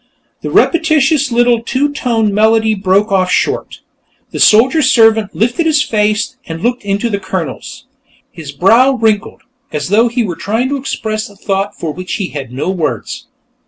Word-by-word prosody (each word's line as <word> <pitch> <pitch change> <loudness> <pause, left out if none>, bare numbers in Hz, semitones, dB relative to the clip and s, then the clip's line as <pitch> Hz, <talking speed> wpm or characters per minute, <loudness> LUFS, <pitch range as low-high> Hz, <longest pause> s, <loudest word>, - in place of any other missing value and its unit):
The - - -4
repetitious 310 -4 +2
little 240 0 +2
two 280 +5 -1
tone 225 -7 0
melody 220 +1 +2
broke 200 +1 +1
off 185 -2 +1
short. - - -1 0.5
The - - -6
soldier 255 +9 +4
servant 225 -6 +3
lifted 245 - 0
his 300 -2 +2
face 215 +2 -1
and 165 +1 -7
looked 245 0 -1
into 205 +3 -1
the 200 -3 -2
Colonel's. 190 -5 -6 0.5
His 155 -4 -9
brow 225 - +3
wrinkled, 220 -4 -1 0.3
as 150 +2 -4
though 220 +4 +3
he 240 +1 -1
were 180 -6 -4
trying 225 +8 -2
to 285 - -1
express 220 -5 -4
a 200 - -17
thought 195 0 -3
for 160 - -3
which 185 +2 -7
he 195 -4 -3
had 135 -5 -7
no 135 +8 -3
words. 155 - -4
220 Hz, 165 wpm, -14 LUFS, 195-245 Hz, 0.5 s, soldier